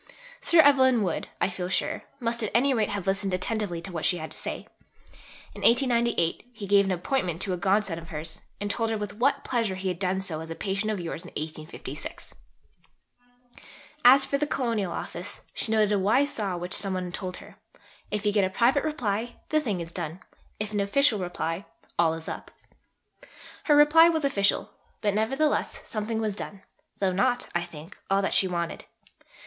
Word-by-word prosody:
Sir 340 Hz, -9 st, +6 dB
Evelyn 260 Hz, -5 st, +5 dB
Wood, 175 Hz, -4 st, -2 dB
I -, -, +2 dB
feel 180 Hz, -1 st, -4 dB
sure, -, -, -1 dB
must 235 Hz, -1 st, -1 dB
at 215 Hz, -, -1 dB
any 270 Hz, +3 st, +4 dB
rate 220 Hz, -4 st, +1 dB
have 200 Hz, -3 st, -3 dB
listened 195 Hz, -1 st, 0 dB
attentively 185 Hz, -3 st, -2 dB
to 190 Hz, -, -6 dB
what 165 Hz, -3 st, -4 dB
she 180 Hz, -, +2 dB
had 160 Hz, -2 st, -6 dB
to -, -, -4 dB
say. -, -, -3 dB, 0.9 s
In -, -, -10 dB
1898 235 Hz, -6 st, +2 dB
he 220 Hz, -4 st, -8 dB
gave 200 Hz, 0 st, +5 dB
an 190 Hz, -, -1 dB
appointment 180 Hz, -, -1 dB
to 190 Hz, -, -1 dB
a -, -, -2 dB
godson 195 Hz, -2 st, +1 dB
of 165 Hz, -, -11 dB
hers 160 Hz, +1 st, -4 dB, 0.2 s
and 205 Hz, -, -2 dB
told 225 Hz, 0 st, 0 dB
her 225 Hz, -, 0 dB
with 205 Hz, -1 st, -5 dB
what 280 Hz, +3 st, +2 dB
pleasure 230 Hz, -6 st, 0 dB
he 190 Hz, 0 st, -2 dB
had 180 Hz, -2 st, -3 dB
done 190 Hz, 0 st, 0 dB
so 180 Hz, -5 st, 0 dB
"as 160 Hz, 0 st, -7 dB
a 165 Hz, -, -5 dB
patient 200 Hz, +3 st, -1 dB
of 210 Hz, -, -2 dB
yours 170 Hz, -1 st, -5 dB
in 180 Hz, -, -11 dB
1856." 155 Hz, +1 st, -6 dB, 1.7 s
As 265 Hz, +2 st, +8 dB
for 280 Hz, -, -1 dB
the 295 Hz, -, 0 dB
Colonial 225 Hz, -10 st, -1 dB
Office, 175 Hz, +3 st, -5 dB
she 220 Hz, -, -3 dB
noted 215 Hz, -2 st, +3 dB
a 205 Hz, -, +3 dB
wise 255 Hz, +9 st, +3 dB
saw 195 Hz, -5 st, -1 dB
which 180 Hz, +1 st, -4 dB
some 195 Hz, -2 st, +2 dB
one 180 Hz, -1 st, -3 dB
told 180 Hz, 0 st, -5 dB
her: -, -, -14 dB, 0.5 s
"If 210 Hz, 0 st, -3 dB
you 205 Hz, -, +2 dB
get 205 Hz, -1 st, +3 dB
a 190 Hz, -, +1 dB
private 245 Hz, +8 st, +3 dB
reply, 240 Hz, -6 st, -2 dB
the 310 Hz, -, +3 dB
thing 210 Hz, -, -2 dB
is 165 Hz, 0 st, -7 dB
done; 170 Hz, 0 st, -5 dB, 0.4 s
if 210 Hz, 0 st, -4 dB
an 205 Hz, -, 0 dB
official 210 Hz, +3 st, +3 dB
reply, 175 Hz, -1 st, -3 dB, 0.3 s
all 165 Hz, -1 st, +4 dB
is 165 Hz, 0 st, -8 dB
up." -, -, -6 dB, 1.2 s
Her 295 Hz, -, +5 dB
reply 305 Hz, +3 st, +7 dB
was 320 Hz, -3 st, 0 dB
official, 200 Hz, -8 st, +1 dB, 0.3 s
but 205 Hz, -1 st, +1 dB
nevertheless 270 Hz, +9 st, 0 dB
something 220 Hz, +1 st, -3 dB
was 215 Hz, -3 st, -1 dB
done; 200 Hz, -1 st, -7 dB, 0.3 s
though 190 Hz, -2 st, +1 dB
not, 245 Hz, +6 st, +1 dB
I 175 Hz, -, +1 dB
think, 170 Hz, 0 st, -10 dB
all 195 Hz, 0 st, +2 dB
that -, -, 0 dB
she 190 Hz, -, +4 dB
wanted. 170 Hz, -2 st, -3 dB
200 Hz, 195 wpm, -27 LUFS, 180-235 Hz, 1.7 s, As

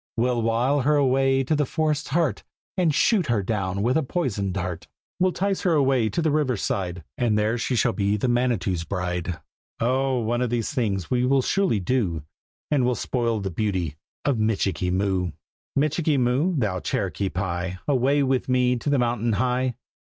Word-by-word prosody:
"We'll 120 Hz, 0 st, +1 dB
wile 120 Hz, +5 st, +1 dB
her 150 Hz, +4 st, +3 dB
away 135 Hz, -1 st, +3 dB
to 155 Hz, +4 st, 0 dB
the 150 Hz, -, +2 dB
forest's 155 Hz, -1 st, -1 dB
heart, 165 Hz, +2 st, 0 dB, 0.3 s
And 180 Hz, -4 st, +2 dB
shoot 185 Hz, +4 st, +2 dB
her 115 Hz, -5 st, +1 dB
down 100 Hz, -2 st, -1 dB
with 125 Hz, +3 st, +2 dB
a 160 Hz, -, +3 dB
poisoned 110 Hz, -, -2 dB
dart!" 90 Hz, -3 st, -4 dB, 0.3 s
"We'll 185 Hz, 0 st, +3 dB
'tice 195 Hz, +1 st, -1 dB
her 180 Hz, -4 st, +2 dB
away 135 Hz, -6 st, +3 dB
to 165 Hz, -, -1 dB
the 160 Hz, -, +2 dB
river 145 Hz, -5 st, +1 dB
side, 90 Hz, -3 st, -2 dB, 0.2 s
And 115 Hz, -4 st, +2 dB
there 105 Hz, +2 st, +1 dB
she 125 Hz, -, -1 dB
shall 115 Hz, +1 st, +2 dB
be 100 Hz, +1 st, 0 dB
the 115 Hz, -, -1 dB
Manitou's 120 Hz, -8 st, 0 dB
bride!" 90 Hz, -2 st, -3 dB, 0.4 s
"Oh! 130 Hz, +2 st, +1 dB
one 120 Hz, +1 st, -1 dB
of 125 Hz, -, 0 dB
these 120 Hz, +4 st, -1 dB
things 100 Hz, -, -1 dB
we 125 Hz, -1 st, +2 dB
will 135 Hz, +1 st, +3 dB
surely 195 Hz, -, +1 dB
do, 90 Hz, -, -1 dB, 0.5 s
And 145 Hz, -4 st, +3 dB
we'll 125 Hz, 0 st, +2 dB
spoil 115 Hz, 0 st, -1 dB
the 95 Hz, -1 st, -3 dB
beauty 90 Hz, -5 st, -1 dB, 0.3 s
of 135 Hz, -6 st, +1 dB
Michikee 95 Hz, -5 st, 0 dB
Moo!" 95 Hz, -2 st, 0 dB, 0.4 s
"Michikee 150 Hz, +1 st, +1 dB
Moo, 130 Hz, +8 st, +1 dB
thou 105 Hz, -7 st, 0 dB
Cherokee 95 Hz, +4 st, -2 dB
Pie, 90 Hz, 0 st, -3 dB
Away 140 Hz, +1 st, +2 dB
with 130 Hz, -1 st, 0 dB
me 125 Hz, -1 st, +3 dB
to 130 Hz, -, -3 dB
the 145 Hz, -, +3 dB
mountain 120 Hz, -2 st, 0 dB
high!" 125 Hz, +3 st, 0 dB
120 Hz, 185 wpm, -24 LUFS, 100-135 Hz, 0.5 s, her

